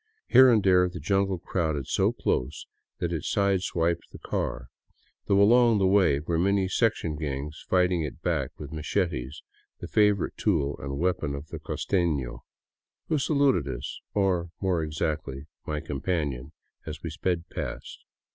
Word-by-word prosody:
Here 130 0 +8
and 110 -4 +4
there 90 -1 +4
the 85 - -7
jungle 95 +4 +1
crowded 80 -5 -2
so - - +2
close 65 +4 -2 0.3
that 85 0 -2
it 80 - -3
side 100 -2 +1
swiped 85 -2 -1
the - - -10
car, 65 -1 -3 0.6
though 100 -1 +4
along 115 +2 +6
the 95 - +2
way 95 -7 +4
were 80 +2 -1
many 100 +1 +2
sectjon 100 -6 0
gangs 75 0 -4
fighting 90 -2 +3
it 75 -3 -5
back - - 0
with - - -8
machetes, 80 -3 -2 0.4
the - - -6
favorite 105 -3 +2
tool 75 -9 +1
and 70 0 -5
weapon 85 -4 0
of 70 +2 -8
the - - -6
costeno, 75 -10 -1 0.7
who 155 - +2
saluted 140 - +2
us 65 0 -5
— - - -57
or, 95 -4 +1
more 95 -4 +1
exactly, 75 -3 -3 0.2
my 75 -1 -2
com 75 -4 -5
panion— 70 -8 -2 0.4
as - - -7
we - - -4
sped 90 -2 -2
past. - - -6
85 Hz, 160 wpm, -27 LUFS, 75-95 Hz, 0.7 s, Here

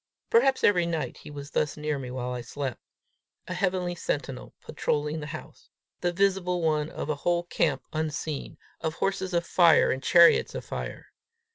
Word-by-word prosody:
Perhaps 275 - +4
every 175 -4 +4
night 165 -2 -3
he 150 - -11
was 145 -1 -8
thus 150 - 0
near 150 -1 -2
me 130 -2 -6
while 125 0 -4
I 125 -1 -3
slept 130 +1 -5 0.7
a 185 - -3
heavenly 180 -1 0
sentinel 140 -6 -4
patrolling 150 +1 -2
the 150 - -6
house - - -10 0.3
the 175 - 0
visible 180 -2 +1
one 155 -1 +1
of - - -5
a 150 -1 -1
whole 175 0 +1
camp 155 -5 0
unseen, 155 -1 -3 0.2
of 160 -1 -2
horses 195 0 -1
of 170 -1 +1
fire 170 -2 +5
and 130 - -2
chariots 170 +3 +5
of - - -5
fire. - - -6
160 Hz, 170 wpm, -27 LUFS, 145-175 Hz, 0.7 s, fire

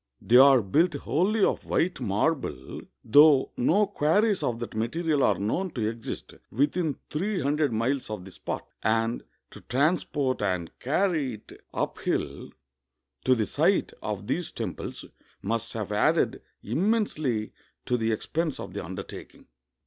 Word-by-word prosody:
They 120 - +4
are 135 -2 +7
built 155 - +2
wholly 190 +9 +1
of - - -1
white 175 -1 0
marble, 105 - -1 0.2
though 145 +3 +6
no 195 +12 +3
quarries 205 +3 +2
of 120 - -1
that 120 - -6
material 145 +7 0
are 105 -7 +3
known 115 - -1
to 110 -4 0
exist 115 +1 -6 0.2
within 145 - 0
three 190 +6 -1
hundred 145 0 +1
miles 120 +4 -1
of 105 -4 -5
the 95 - -11
spot, - - -5
and 115 +1 0 0.3
to - - -12
transport 140 -1 0
and 90 -5 -1
carry 150 - 0
it 105 - -16 0.2
uphill - - -2 0.8
to 130 - +5
the 110 -3 0
site - - +1
of - - -4
these - - -2
temples - - -5 0.4
must 115 +3 -2
have 105 -3 -4
added 105 - +2 0.2
im 155 - 0
mensely 150 - -1 0.3
to 125 - +1
the 115 -1 0
expense 155 +7 -2
of - - -7
the - - -4
undertaking. - - -9
130 Hz, 145 wpm, -27 LUFS, 110-160 Hz, 0.8 s, are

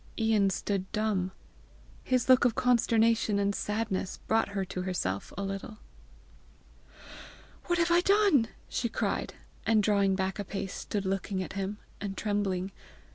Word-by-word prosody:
Ian 220 -3 +3
stood 190 0 -2
dumb. 205 -4 0 0.7
His 255 -2 +1
look 255 -1 +6
of 245 -2 +3
consternation 230 -3 +3
and 200 0 +1
sadness 210 -3 -2
brought 225 0 +2
her 200 -1 -2
to 185 0 -4
herself 175 - -2
a 200 - -2
little. 195 +2 -5 1.9
"What 350 -1 +1
have 335 0 +2
I 345 +1 +5
done!" 390 - +4 0.2
she 235 - -1
cried, - - -2 0.3
and 220 -2 +3
drawing 200 -2 +3
back 190 +1 -2
a - - -1
pace, 195 -1 -5
stood 200 -2 -3
looking 190 0 -1
at - - -8
him, 195 +1 -3 0.2
and 200 -1 -4
trembling. 195 -3 -1
205 Hz, 145 wpm, -29 LUFS, 195-225 Hz, 1.9 s, look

